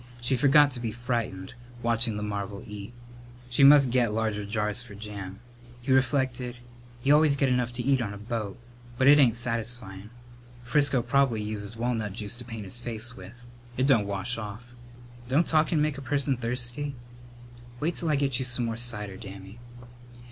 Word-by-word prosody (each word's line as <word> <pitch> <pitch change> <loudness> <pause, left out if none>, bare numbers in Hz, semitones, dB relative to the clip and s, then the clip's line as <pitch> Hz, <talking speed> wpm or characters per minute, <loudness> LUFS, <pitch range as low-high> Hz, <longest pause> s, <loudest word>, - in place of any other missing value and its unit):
She 120 +2 0
forgot 145 +2 +5
to 125 - -5
be 115 -2 -3
frightened, 115 -5 -3 0.3
watching 115 -2 +1
the 105 - -3
marvel 100 -1 -4
eat. 105 0 -8 0.6
She 130 +4 +3
must 140 -2 +8
get 120 -3 +2
larger 105 -2 -1
jars 105 +2 -1
for 115 -4 -10
jam. 100 -2 -7 0.4
He 125 +2 -3
reflected: 130 -2 +1 0.5
"You 140 - +5
always 150 -1 +5
get 135 -1 +2
enough 125 -1 +1
to 120 0 -3
eat 135 0 +2
on 105 -4 -2
a 105 - -7
boat, 105 -1 -4 0.4
but 130 - +2
it 145 +2 +8
ain't 120 -5 +5
satisfyin'. 115 -4 -4 0.5
Frisco 130 0 +3
prob'ly 125 -4 +2
uses 105 0 -5
walnut 115 -4 -1
juice 105 +2 -6
to 120 - -6
paint 115 -3 -7
his 100 +5 -6
face 120 0 -6
with. 115 +6 -12 0.3
It 130 - +2
don't 115 -8 +4
wash 100 +4 -2
off. 110 +4 -8 0.6
Don't 150 +6 +3
talkin' 155 0 +2
make 150 -2 0
a - - -8
person 140 0 +1
thirsty?" 125 +4 -2 0.8
"Wait 165 +4 0
till 170 - -2
I 150 - +3
get 140 -3 0
you 130 - -1
some 125 -1 -1
more 115 -1 -3
cider, 105 -5 -1
Dammy." 95 +3 -10
120 Hz, 175 wpm, -27 LUFS, 105-130 Hz, 0.8 s, must